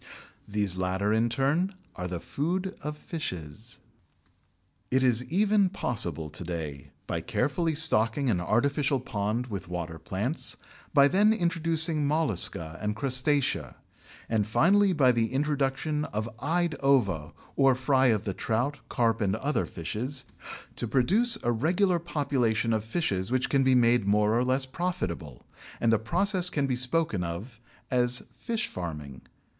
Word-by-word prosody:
These 100 -3 -1
latter 95 +3 0
in 115 +2 +2
turn 145 - +1 0.2
are 90 -1 -4
the 90 -1 -4
food 180 - -2
of 150 +1 -5
fishes. 110 - -6 1.1
It 130 +1 +2
is 125 -1 +3
even 200 +4 +3
possible 90 - -2
to 85 - -4
day 80 -5 -5 0.2
by - - -3
carefully 160 +2 0
stocking 135 -4 +2
an 95 -7 +1
artificial 140 - +1
pond 110 0 -2
with 100 -7 -6
water 85 -2 -5
plants, 105 - -2 0.3
by 140 -2 +6
then 205 +7 +4
introducing 165 -5 +1
Mollusca 100 - +1
and 105 0 -1
Crustacea, 135 +3 +1 0.5
and 110 -2 0
finally 195 - +4
by 140 -7 +4
the 115 -2 0
introduction 145 +2 0
of 110 +2 -3
"eyed 165 +4 +1
ova" 100 - +2 0.2
or 135 -2 +4
fry 130 0 +3
of 110 -5 +2
the 100 - -3
trout, 125 +9 -1
carp, 115 -2 +1
or 100 0 +1
other 150 +2 0
fishes, 115 - -4 0.5
to 120 - -1
produce 205 - +3
a 120 - +2
regular 175 - +2
population 130 -8 0
of 110 -1 0
fishes 110 - -1
which 130 +1 0
can 135 -1 +3
be 130 -1 +4
made 120 -3 +3
more 105 +2 +3
or 120 - +2
less 130 +1 +1
profitable, 130 - -4 0.3
and 115 -1 +3
the 110 - +3
process 180 - +1
can 145 -5 0
be 130 -2 0
spoken 130 - 0
of 100 +8 -6 0.3
as 125 -1 +2
"fish 230 -2 -2
farming." 75 -7 -7
125 Hz, 145 wpm, -28 LUFS, 105-150 Hz, 1.1 s, by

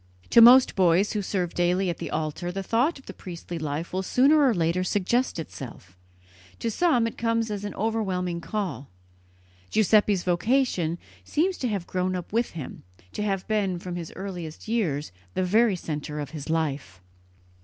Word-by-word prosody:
To 235 - +8
most 250 +3 +8
boys 185 +1 +3
who 210 - -1
serve 180 -3 -2
daily 180 +2 +1
at 170 - -3
the - - -4
altar 155 +3 -3
the 195 +2 -4
thought 245 - +1
of 270 - -16
the 195 - -8
priestly 175 -2 -7
life 155 +3 -4
will 185 - 0
sooner 275 +10 +4
or 265 - +5
later 175 -2 +1
suggest 205 +7 0
itself; 125 - -8 0.6
to 230 - -2
some 255 -4 +2
it 230 - -5
comes 230 -1 0
as 205 -1 -4
an 205 - -5
overwhelming 190 -6 -1
call. 180 - -4 0.8
Giuseppe's 210 -3 +3
vocation 180 -2 +1 0.3
seems 360 +5 0
to 255 - -1
have 200 -6 -2
grown 185 +1 -1
up 180 +2 -6
with 235 +1 0
him, 155 -6 -7 0.3
to - - -4
have 195 -3 -1
been, 200 -4 0
from 175 0 -6
his 170 -2 -6
earliest 180 -4 -7
years, 170 -11 -1 0.2
the 185 - +1
very 215 +3 +3
centre 150 -3 -5
of 145 -1 -5
his 155 -2 -7
life. 145 - -2
185 Hz, 175 wpm, -26 LUFS, 170-225 Hz, 0.8 s, To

